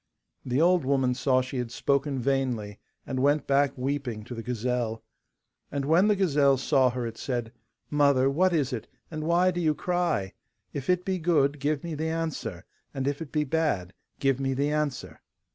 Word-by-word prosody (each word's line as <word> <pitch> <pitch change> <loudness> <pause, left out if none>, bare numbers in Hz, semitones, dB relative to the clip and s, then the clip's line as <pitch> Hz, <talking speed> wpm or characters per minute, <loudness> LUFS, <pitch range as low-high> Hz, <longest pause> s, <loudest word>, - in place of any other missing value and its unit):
The 125 +1 0
old 175 0 +4
woman 130 -2 +2
saw 130 0 +2
she 130 0 -4
had 120 -1 -3
spoken 140 +3 0
vainly, 125 -5 -1 0.3
and 130 - -3
went 145 +2 +2
back 140 0 +2
weeping 130 -4 -3
to 120 - -8
the 115 - -5
gazelle. 120 -1 -2 0.7
And 140 -1 -2
when 165 +7 +4
the 210 - +4
gazelle 145 -8 +3
saw 130 0 +3
her 125 0 -3
it 115 -1 -6
said, 120 -4 -3 0.4
'Mother, 140 -3 +4
what 180 +7 +3
is 145 -6 0
it, 115 -1 -4 0.2
and 155 -1 -4
why 175 +2 +3
do 175 0 -3
you 155 -2 +2
cry? 175 - -1 0.4
If 140 +1 -5
it 180 0 +2
be 190 -1 -1
good, 150 -4 +2
give 145 0 -1
me 170 -1 -4
the 160 +2 -2
answer; 165 -1 -3 0.3
and 135 0 -2
if 145 +2 -2
it 160 - -7
be 150 -1 +1
bad, 135 - -1 0.2
give 135 -1 +1
me 135 -1 -1
the 140 +2 0
answer. 150 -3 -3
140 Hz, 190 wpm, -27 LUFS, 125-155 Hz, 0.7 s, old